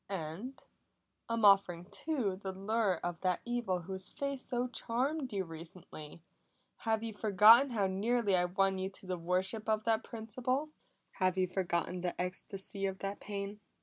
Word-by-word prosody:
And 195 Hz, -, -5 dB, 0.6 s
I'm 230 Hz, -2 st, +2 dB
offering 195 Hz, -4 st, +5 dB
too 255 Hz, -12 st, -1 dB
the 190 Hz, 0 st, -5 dB
lure 195 Hz, +1 st, +1 dB
of 175 Hz, -1 st, -3 dB
that 185 Hz, -2 st, +1 dB
evil 240 Hz, -7 st, -1 dB
whose 190 Hz, +1 st, -6 dB
face 280 Hz, -2 st, -3 dB
so 245 Hz, 0 st, -1 dB
charmed 255 Hz, +4 st, -1 dB
you 195 Hz, -2 st, -1 dB
recently. 165 Hz, -1 st, -10 dB, 0.5 s
Have 225 Hz, -1 st, 0 dB
you 225 Hz, -1 st, -4 dB
forgotten 215 Hz, +6 st, +7 dB
how 215 Hz, -5 st, +1 dB
nearly 205 Hz, +2 st, +1 dB
I 180 Hz, -1 st, +3 dB
won 190 Hz, +1 st, +1 dB
you 190 Hz, 0 st, -2 dB
to 195 Hz, -, -7 dB
the 185 Hz, -1 st, -3 dB
worship 185 Hz, +6 st, 0 dB
of 215 Hz, 0 st, +2 dB
that 225 Hz, 0 st, +2 dB
principle? 255 Hz, +6 st, -2 dB, 0.4 s
Have 185 Hz, -1 st, +1 dB
you 185 Hz, -, +3 dB
forgotten 180 Hz, -1 st, -1 dB
the 175 Hz, -1 st, -3 dB
ecstasy 195 Hz, +2 st, -3 dB
of 190 Hz, 0 st, -4 dB
that 195 Hz, +1 st, -4 dB
pain?" 200 Hz, 0 st, -5 dB
195 Hz, 160 wpm, -33 LUFS, 185-230 Hz, 0.6 s, forgotten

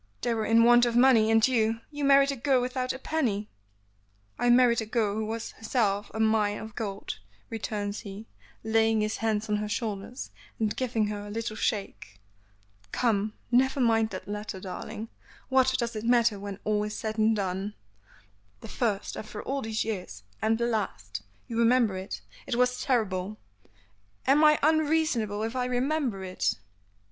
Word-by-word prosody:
"They 240 Hz, -, +1 dB
were 220 Hz, -1 st, -1 dB
in 230 Hz, +1 st, +5 dB
want 240 Hz, +1 st, +6 dB
of 235 Hz, -, -1 dB
money, 240 Hz, -3 st, +6 dB
and 225 Hz, +1 st, +5 dB
you 225 Hz, -3 st, +1 dB
you 290 Hz, -1 st, -5 dB
married 275 Hz, 0 st, +5 dB
a -, -, -3 dB
girl 265 Hz, +1 st, +2 dB
without 255 Hz, +1 st, -1 dB
a -, -, -5 dB
penny." 240 Hz, -9 st, -1 dB, 0.9 s
"I 245 Hz, -, +2 dB
married 240 Hz, -1 st, +5 dB
a -, -, -4 dB
girl 220 Hz, -3 st, +1 dB
who 215 Hz, 0 st, -2 dB
was 225 Hz, +1 st, -4 dB
in -, -, -23 dB
herself 210 Hz, -3 st, 0 dB
a 220 Hz, -, -6 dB
mine 215 Hz, -2 st, +2 dB
of 220 Hz, 0 st, -8 dB
gold," 200 Hz, -, -5 dB, 0.3 s
returns 210 Hz, -2 st, -3 dB
he, 205 Hz, 0 st, -8 dB, 0.4 s
laying 220 Hz, 0 st, +3 dB
his 215 Hz, 0 st, -1 dB
hands 220 Hz, -1 st, -1 dB
on 210 Hz, 0 st, +1 dB
her 210 Hz, 0 st, -3 dB
shoulders 215 Hz, +2 st, -4 dB, 0.3 s
and 215 Hz, -2 st, 0 dB
giving 235 Hz, -4 st, 0 dB
her 205 Hz, 0 st, -5 dB
a -, -, -8 dB
little 220 Hz, +1 st, -3 dB
shake. 210 Hz, -2 st, -3 dB, 0.7 s
"Come, 215 Hz, -3 st, +1 dB, 0.2 s
never 265 Hz, +3 st, +3 dB
mind 225 Hz, -3 st, +3 dB
that 185 Hz, -, -7 dB
letter, 210 Hz, -1 st, -5 dB
darling; 215 Hz, +4 st, -6 dB, 0.4 s
what 260 Hz, -1 st, +4 dB
does 235 Hz, -2 st, -2 dB
it 215 Hz, -, -4 dB
matter 235 Hz, -3 st, +3 dB
when 200 Hz, -1 st, -6 dB
all 210 Hz, -1 st, +1 dB
is 210 Hz, 0 st, -4 dB
said 220 Hz, 0 st, -4 dB
and 220 Hz, +1 st, +4 dB
done?" 195 Hz, +1 st, -3 dB, 0.9 s
"The -, -, -9 dB
first 210 Hz, -5 st, -1 dB
after 215 Hz, 0 st, -7 dB
all 275 Hz, +1 st, -2 dB
these 220 Hz, -2 st, -2 dB
years; 180 Hz, -, -5 dB, 0.2 s
and 225 Hz, +1 st, +2 dB
the, 235 Hz, -, 0 dB
last 105 Hz, -, -3 dB, 0.3 s
you 230 Hz, -1 st, -3 dB
remember 235 Hz, -3 st, +4 dB
it? 190 Hz, +2 st, -6 dB, 0.3 s
It 240 Hz, -, -1 dB
was 250 Hz, 0 st, +2 dB
terrible. 210 Hz, -5 st, 0 dB, 0.9 s
Am 285 Hz, +3 st, +5 dB
I 300 Hz, 0 st, +7 dB
unreasonable 300 Hz, -9 st, +2 dB
if 225 Hz, +3 st, -3 dB
I 250 Hz, -1 st, 0 dB
remember 250 Hz, -4 st, -1 dB
it?" 185 Hz, 0 st, -1 dB
225 Hz, 175 wpm, -28 LUFS, 210-245 Hz, 0.9 s, I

